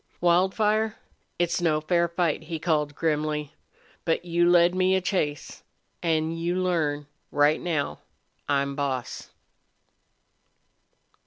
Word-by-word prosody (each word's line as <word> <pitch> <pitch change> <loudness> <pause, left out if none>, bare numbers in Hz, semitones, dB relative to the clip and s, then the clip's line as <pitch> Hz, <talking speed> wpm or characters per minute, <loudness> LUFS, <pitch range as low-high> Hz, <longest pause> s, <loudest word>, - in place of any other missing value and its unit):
"Wildfire, 210 +5 +2 0.4
it's 175 +1 0
no 155 -3 +2
fair 170 +2 +1
fight," 170 -2 -1
he 165 - -4
called, 150 -3 0
grimly. 150 -2 -1 0.5
"But 165 +1 0
you 175 0 +2
led 175 0 +5
me 185 +1 +2
a - - +3
chase. 175 -6 -2 0.4
An' 160 -1 +1
you 165 +2 -2
learn 160 -6 0 0.2
right 145 +2 +3
now 160 -5 -2 0.5
I'm 140 0 +1
boss!" 135 -3 -3
165 Hz, 110 wpm, -26 LUFS, 150-175 Hz, 0.5 s, led